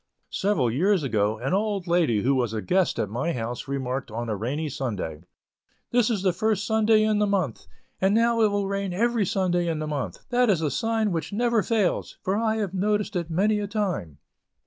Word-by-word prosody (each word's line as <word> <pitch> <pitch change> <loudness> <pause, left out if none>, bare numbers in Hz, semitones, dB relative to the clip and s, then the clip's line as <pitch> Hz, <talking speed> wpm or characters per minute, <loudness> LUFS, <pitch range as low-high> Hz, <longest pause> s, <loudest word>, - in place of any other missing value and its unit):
Several 165 - +1
years 180 - +2
ago 110 -4 0
an 130 +9 -2
old 200 -2 0
lady 165 - +2
who 135 - +3
was 120 -4 0
a 110 - -2
guest 185 -1 +1
at - - 0
my 125 - -2
house, 120 +2 -4
remarked 135 -2 -3
on 115 +2 -4
a 110 - 0
rainy 135 +10 -2
Sunday: 105 - -4 0.7
"This 240 -2 +3
is 210 -5 -1
the 185 -2 +2
first 210 +2 0
Sunday 220 -1 +3
in 215 -1 +2
the 210 - +2
month, 180 - -1 0.3
and 195 +2 +3
now 230 0 +3
it 215 - +5
will 200 -1 -1
rain 195 -1 -2
every 230 0 +1
Sunday 180 -3 +1
in 165 -2 -1
the 155 - -3
month; 145 -3 -4
that 245 -1 +3
is 175 -5 +2
a 150 - 0
sign 225 - 0
which 165 -2 -3
never 235 +1 +2
fails, 210 -4 0
for 190 - 0
I 220 0 +1
have 205 -4 -2
noticed 210 +2 0
it 170 -2 -2
many 205 +6 +2
a 205 - -3
time." 185 - -2
185 Hz, 210 wpm, -25 LUFS, 135-210 Hz, 0.7 s, it